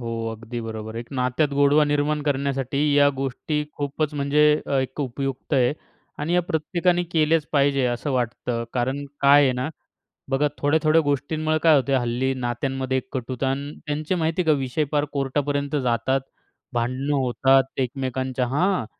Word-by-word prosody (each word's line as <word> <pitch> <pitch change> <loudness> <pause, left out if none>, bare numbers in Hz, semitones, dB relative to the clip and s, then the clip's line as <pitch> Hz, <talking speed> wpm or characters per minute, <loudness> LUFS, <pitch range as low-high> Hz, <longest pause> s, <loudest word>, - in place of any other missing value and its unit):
हो, 115 -1 -4 0.2
अगदी 115 +2 -6
बरोबर 110 -1 -6
आहे, 115 - -3
एक 120 - -11
नात्यात 130 +3 +1
गोडवा 145 +2 +5
निर्माण 145 +1 0
करण्यासाठी 140 -2 -1 0.2
या 145 0 +6
गोष्टी 135 +3 -2
खूपच 145 +1 -2
म्हणजे 145 +1 +2 0.2
अ, - - -4
एक 130 +2 -3
अ, - - +2
उपयुक्त 135 +2 -4
आहे 125 -1 +3 0.5
आणि 150 +3 -2
या 180 - +3
प्रत्येकाने 175 +2 0
केल्याच 155 -1 +2
पाहिजे, 140 -2 +3
असं 120 +4 -2
वाटतं. 120 -1 -2
कारण 130 +3 -1 0.2
काय 140 +1 +7
आहे 135 -2 +3
ना, 125 +3 -2 0.6
बघा 135 +2 +2
थोड्या-थोड्या 155 +2 +3
गोष्टींमुळे 155 +2 0
काय 160 -2 +7
होतं. 135 0 +2
हल्ली 125 +2 0
नात्यांमध्ये 130 +1 -2
एक 130 - -4
कटुता 130 +1 -2
आणि 140 +2 -3
त्यांचे 150 +4 -1
माहिती 165 +1 0
आहे - - -3
का, - - 0
विषय 135 +3 -1
फार 150 -1 +1
कोर्टापर्यंत 140 +1 -1
जातात, 125 +2 +1 0.5
भांडणं 130 +4 -1
होतात 135 +1 +2
एकमेकांच्या 130 0 -2
हां, 145 - +1
140 Hz, 160 wpm, -23 LUFS, 130-150 Hz, 0.6 s, काय